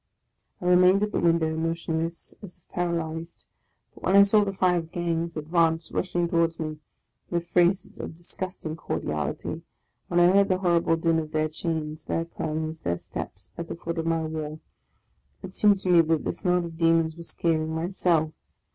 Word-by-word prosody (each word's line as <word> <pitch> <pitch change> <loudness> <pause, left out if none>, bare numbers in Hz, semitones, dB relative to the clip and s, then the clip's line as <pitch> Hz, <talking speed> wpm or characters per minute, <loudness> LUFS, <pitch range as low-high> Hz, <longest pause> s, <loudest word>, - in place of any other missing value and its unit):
" - - -46
I - - -6
re 180 0 +5
mained 185 +3 +5
at 210 - -1
the - - 0
window, 165 -2 +2
motionless, 165 0 -2
as 195 -4 -10
if 180 - -34
paralyzed; 165 -1 -3 0.5
but - - -16
when 190 - +2
I 200 - +9
saw 205 +1 +4
the 200 - -1
five 180 -4 +1
gangs 170 -1 -2
advance, 165 +1 +1
rushing 175 -2 0
towards 170 -1 +1
me 155 -1 -4 0.5
with 170 -1 -1
phrases 180 +2 +2
of - - -6
disgusting 175 -1 -6
cordiality; 75 - -3 0.5
when 175 - +2
I 175 - +7
heard 200 +1 +5
the 185 - +3
horrible 170 -3 +2
din 165 0 +2
of 155 -1 -4
their 155 0 +1
chains, 155 -1 -4
their 165 - -1
clamours, 160 -1 -4
their 85 0 -1
steps - - -8
at 170 - -4
the - - -5
foot 170 0 -4
of 165 - -2
my 165 -1 +1
wall, 155 -1 -4 0.8
it 185 - -8
seemed 205 -1 +5
to 185 - -2
me 175 -2 +7
that 160 -1 +1
this - - -4
knot 180 -2 +2
of 165 -1 -9
demons 165 -1 +3
were 170 - -10
scaling 165 -1 0
my 160 +2 -2
cell! 165 -5 +1
165 Hz, 190 wpm, -26 LUFS, 160-175 Hz, 0.8 s, I